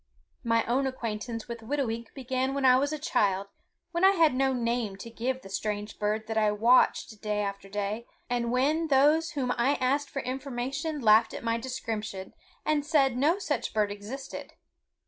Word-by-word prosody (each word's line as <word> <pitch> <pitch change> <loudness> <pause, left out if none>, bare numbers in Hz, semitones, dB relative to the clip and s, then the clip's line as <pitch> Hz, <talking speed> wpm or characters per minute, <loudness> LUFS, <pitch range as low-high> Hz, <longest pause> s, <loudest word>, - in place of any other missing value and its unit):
My 230 -1 +2
own 265 +3 +1
acquaintance 230 -2 -4
with 235 -1 -6
Whitooweek 230 -2 -3
began 260 0 -1
when 280 -1 0
I 255 -1 +7
was 280 +3 +1
a 310 - -2
child, 200 -8 0 0.4
when 340 +1 -1
I 385 +1 +7
had 325 -7 +4
no 265 +1 +2
name 235 -4 -1
to 230 +4 -9
give 255 +3 -3
the - - -9
strange 210 +1 -3
bird 215 +1 -1
that 220 0 -1
I 215 -1 +3
watched 220 0 +3
day 210 -1 -1
after 200 -1 -4
day, 205 +3 -3 0.2
and 240 -1 -1
when 295 +6 +2
those 300 +4 +4
whom 265 -4 -1
I 270 +5 +3
asked 275 +3 0
for 275 - -4
information 270 +4 -3
laughed 220 0 +5
at - - -7
my 230 0 0
description 220 -6 -5 0.3
and 300 -1 +1
said 280 -4 +3
no 295 +8 +3
such 360 - -2
bird 210 -1 +2
existed. 225 +7 -7
245 Hz, 180 wpm, -28 LUFS, 220-275 Hz, 0.4 s, I